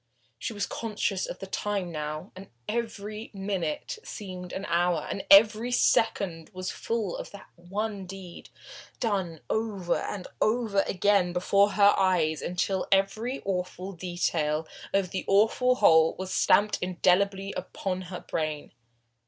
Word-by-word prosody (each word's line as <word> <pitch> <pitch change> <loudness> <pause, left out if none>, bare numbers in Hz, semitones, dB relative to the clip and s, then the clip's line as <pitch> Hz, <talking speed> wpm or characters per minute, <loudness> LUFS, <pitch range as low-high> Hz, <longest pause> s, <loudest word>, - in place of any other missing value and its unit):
She - - -3
was 205 -2 -2
conscious 210 -4 -2
of - - -6
the - - -7
time 195 -2 -2
now, 155 +3 -5
and 190 +1 -10 0.2
every 215 -1 -4
minute 195 - -3
seemed 185 -4 -7
an 195 - -4
hour, 175 -1 +1
and 195 - -4
every 215 +4 +7
second 190 -9 +2
was 185 0 -4
full 225 -5 -2
of - - -6
that 200 - -13
one 195 +2 -4
deed, 185 -2 -10 0.5
done 190 - -1
over 205 -6 -1
and 190 -3 -5
over 215 -3 +2
again 195 -2 +2
before 200 +3 +3
her 205 -1 +6
eyes, 175 -5 +2
until 180 +2 -1
every 205 +7 +1
awful 185 0 -3
detail 165 -4 -1 0.2
of 195 -2 +1
the 190 - -3
awful 225 +5 +4
whole 160 -8 +5
was 190 0 -5
stamped 205 +1 +3
indelibly 195 +2 +1
upon 185 -1 -3
her 180 - -6
brain. 155 -2 -3
195 Hz, 135 wpm, -28 LUFS, 180-205 Hz, 0.5 s, every